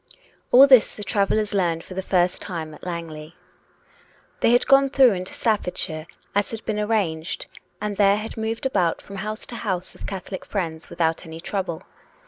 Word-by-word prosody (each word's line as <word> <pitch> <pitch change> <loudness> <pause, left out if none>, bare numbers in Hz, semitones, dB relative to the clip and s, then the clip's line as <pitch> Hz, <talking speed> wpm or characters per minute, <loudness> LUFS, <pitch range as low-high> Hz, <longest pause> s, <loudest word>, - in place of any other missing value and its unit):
All 260 +3 +10
this 260 -5 +6
the 210 - -5
travellers 205 +1 +1
learned 170 -4 +1
for - - -10
the 190 - -2
first 180 -1 +1
time 160 -4 -5
at - - -14
Lang 170 -2 -4
ley. 155 +1 -10 1.0
They - - +3
had 245 +1 +4
gone 275 0 +5
through 265 -3 +6
into 185 -1 -4
Staffordshire, 180 -7 -1 0.3
as 205 0 +1
had 225 -1 -7
been 210 -1 -1
arranged, 195 -7 -1 0.3
and 210 -1 -3
there 200 0 +5
had 215 +1 -6
moved 225 +2 -3
about 185 -10 +1
from 200 - -10
house 215 +3 -4
to 235 - -7
house 185 -4 -3
of - - -8
Catholic 190 -1 -6
friends 165 -5 -4
without 165 -1 0
any 160 0 -8
trouble. 180 -2 -3
195 Hz, 180 wpm, -23 LUFS, 170-215 Hz, 1.0 s, All